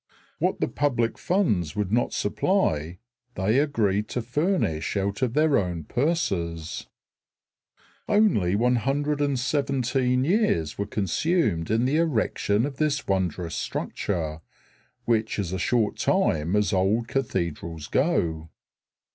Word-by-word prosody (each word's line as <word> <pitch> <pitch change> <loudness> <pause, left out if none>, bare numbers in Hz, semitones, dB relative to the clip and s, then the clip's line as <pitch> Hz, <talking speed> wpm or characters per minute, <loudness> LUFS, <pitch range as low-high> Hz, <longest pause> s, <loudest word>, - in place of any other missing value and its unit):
What - - 0
the - - +1
public 120 -6 0
funds 105 - 0
would 105 -2 -1
not 120 +2 +1
supply 90 - 0 0.4
they 105 +7 +2
agreed 105 -8 +1
to 125 - -3
furnish 125 - 0
out 100 +3 -2
of 125 -1 0
their 155 -1 +4
own 90 -4 -3
purses. 85 - -2 1.2
Only 190 - +3
117 135 0 +1
years 170 - +1
were 100 - -1
consumed 105 - 0
in 115 +3 +2
the 140 +4 +2
erection 120 -7 +1
of 140 -2 -5
this 150 -2 0
wondrous 90 -3 -1
structure, 80 -5 -3 0.6
which 110 -1 +1
is 95 -3 -2
a 95 - -2
short 115 +2 +1
time 80 +4 +1
as 105 -1 +1
old 100 +5 +1
cathedrals 85 - -3
go. 80 - 0
110 Hz, 115 wpm, -25 LUFS, 90-140 Hz, 1.2 s, their